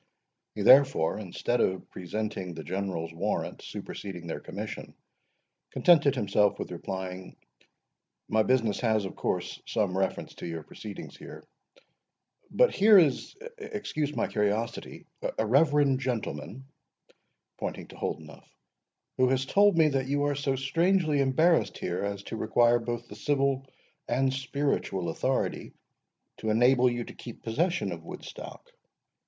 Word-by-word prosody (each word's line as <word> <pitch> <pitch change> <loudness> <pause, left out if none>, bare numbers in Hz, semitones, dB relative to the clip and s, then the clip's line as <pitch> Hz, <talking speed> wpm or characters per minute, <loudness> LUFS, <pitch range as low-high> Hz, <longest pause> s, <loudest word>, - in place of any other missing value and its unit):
He, - - -2
therefore, 135 - +5
instead 110 +4 -1
of 95 0 0
presenting 95 -1 -4
the 80 - -7
General's 90 -4 -3
warrant 85 - -2
superseding 90 -4 -7
their 85 - -4
commission, - - -7 0.7
contented 145 -5 +4
himself 105 -3 +2
with - - -5
replying,—"My 95 - -6
business 115 -3 +1
has, 110 -4 +1
of 95 - -6
course, - - -2
some 100 -4 0
reference 95 0 -2
to - - -6
your 80 -2 -5
proceedings 105 +6 -9
here. - - -11 1.1
But - - +3
here 210 +1 +7
is—excuse 205 - -1
my - - +1
curiosity—a 110 +1 -2
reverend 140 +2 +4
gentleman," 125 - -4 0.9
pointing - - -4
to - - -12
Holdenough, 80 -2 -6 0.7
"who 130 0 +4
has 135 0 +1
told 200 +4 +4
me 160 -2 +6
that 135 -2 -1
you 145 +1 +1
are 145 0 +1
so 140 -1 0
strangely 160 +3 +2
embarrassed 160 +6 +3
here, 90 +2 -3
as 100 0 -3
to 110 - -6
require 120 +2 +3
both 120 0 -4
the 105 - -10
civil 135 +2 0 0.4
and 130 +2 +1
spiritual 135 - -1
authority 80 - -1 0.6
to 110 - -3
enable 125 +3 +5
you 120 0 -2
to - - -10
keep 120 - -10
possession 145 - 0
of 85 -1 -7
Woodstock." - - -9
120 Hz, 130 wpm, -28 LUFS, 100-140 Hz, 1.1 s, here